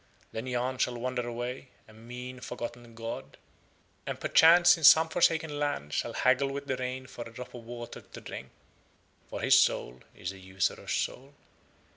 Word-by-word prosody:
Then 110 +3 -5
Yahn 125 +1 -2
shall 125 -1 +1
wander 125 0 -2
away, 120 +3 -5 0.2
a 110 - -16
mean 125 +3 -8
forgotten 120 -2 -7
god, 115 -12 -6 0.7
and - - -4
perchance 175 +2 +7
in 165 - -9
some 160 +2 +8
forsaken 160 -3 +2
land 75 - -2
shall - - -1
haggle 130 +2 +3
with 140 +1 -5
the 130 - -1
rain 130 +1 -4
for 120 - -10
a - - -16
drop 125 +2 -9
of 120 -2 -10
water 120 0 -8
to - - -12
drink, 65 0 -8 0.8
for - - -5
his - - +5
soul 65 +1 +1
is 90 - -5
a 95 - -12
usurer's 95 -1 -2
soul. 135 +3 -3
125 Hz, 170 wpm, -29 LUFS, 115-135 Hz, 0.8 s, some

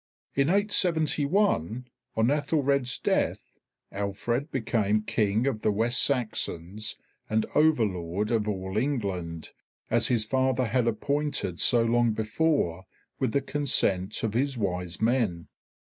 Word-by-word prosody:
In 140 +2 +2
871, 165 - +1 0.3
on 110 +1 +2
Aethelred's 140 -3 +1
death, - - -1 0.4
Alfred 105 - -2
became 110 -5 0
King 110 +2 0
of 115 -6 -1
the 105 - +2
West 115 +4 +1
Saxons 110 - -1 0.3
and 110 0 +1
Over 150 -6 +4
lord 95 +2 -3
of 110 -2 +1
all 95 -1 -3
England, 95 - -3 0.4
as 115 +1 +3
his 115 -4 +1
father 130 +1 +1
had 120 +1 0
appointed 115 - -1
so 120 -1 +4
long 120 0 +2
before 110 - 0 0.3
with 130 -4 0
the 140 - +1
consent 120 -10 +1
of 110 -2 -1
his 135 +2 0
Wise 90 -4 -2
Men. 110 -8 0
115 Hz, 125 wpm, -27 LUFS, 100-140 Hz, 0.4 s, Over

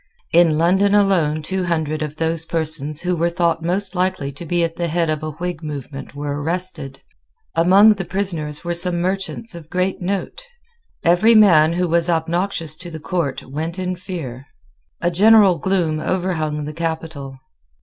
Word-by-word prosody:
In 165 -2 +5
London 190 +5 +3
alone 170 -7 +2
two 190 +3 -2
hundred 155 -3 -1
of 150 -1 -4
those 165 0 -2
persons 155 -2 -1
who 180 0 0
were 170 +1 +1
thought 170 -1 0
most 185 +4 0
likely 180 -6 -1
to 150 +5 -10
be 175 +1 +1
at 165 0 -2
the 170 0 -2
head 165 0 0
of 155 -1 -2
a 155 - -4
Whig 175 +2 -5
movement 140 -3 -7
were 145 0 -4
arrested. 160 -4 -3 0.5
Among 190 +6 +6
the 195 -2 -5
prisoners 170 -5 -3
were 175 0 -2
some 175 0 +1
merchants 195 +5 -3
of 165 -2 -11
great 185 +2 -1
note. 195 - -3 0.6
Every 180 +7 +4
man 165 -7 +6
who 180 +1 0
was 170 +1 +2
obnoxious 165 0 -1
to 175 0 -8
the 160 -1 -7
Court 165 -4 -2
went 160 +6 -5
in 185 0 -2
fear. 145 -8 -7 0.5
A 175 - +1
general 200 -1 +5
gloom 175 -5 0
overhung 155 -4 -2
the 150 - -6
capital. 160 -4 -5
170 Hz, 170 wpm, -20 LUFS, 155-185 Hz, 0.6 s, Among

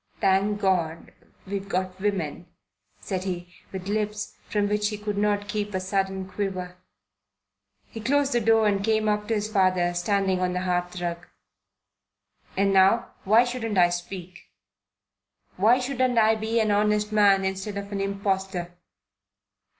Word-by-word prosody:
"Thank 195 +2 +2
God, 170 -5 0 0.3
we've 200 0 -5
got 185 0 -2
women," 180 -5 -2 0.5
said 185 -2 -3
he, 180 -2 -5 0.2
with 190 -1 -6
lips 210 0 -2
from 205 -1 +1
which 210 0 +1
he 210 - -4
could 210 0 -4
not 205 0 0
keep 210 -1 -3
a - - +1
sudden 190 0 -2
quiver. 185 -2 -4 1.1
He 225 - -8
closed 280 +4 +2
the 240 - +2
door 225 0 +4
and 200 -1 +1
came 220 0 +1
up 210 0 0
to 225 - +1
his 210 0 -1
father 185 -4 +2
standing 190 +1 +1
on 180 0 0
the 180 - -1
hearthrug. 180 -1 -2 1.3
"And 195 0 +3
now, 195 +5 +4
why 220 +5 +6
shouldn't 240 -4 -3
I 175 -1 +6
speak? 175 0 -7 1.1
Why 220 +6 +4
shouldn't 255 -1 0
I 220 0 +5
be 220 +1 -1
an 215 -1 +2
honest 210 +1 +2
man 200 -2 +4
instead 190 +2 -3
of 200 0 -6
an 200 -1 -2
impostor?" 195 -3 -2
200 Hz, 150 wpm, -25 LUFS, 185-210 Hz, 1.3 s, why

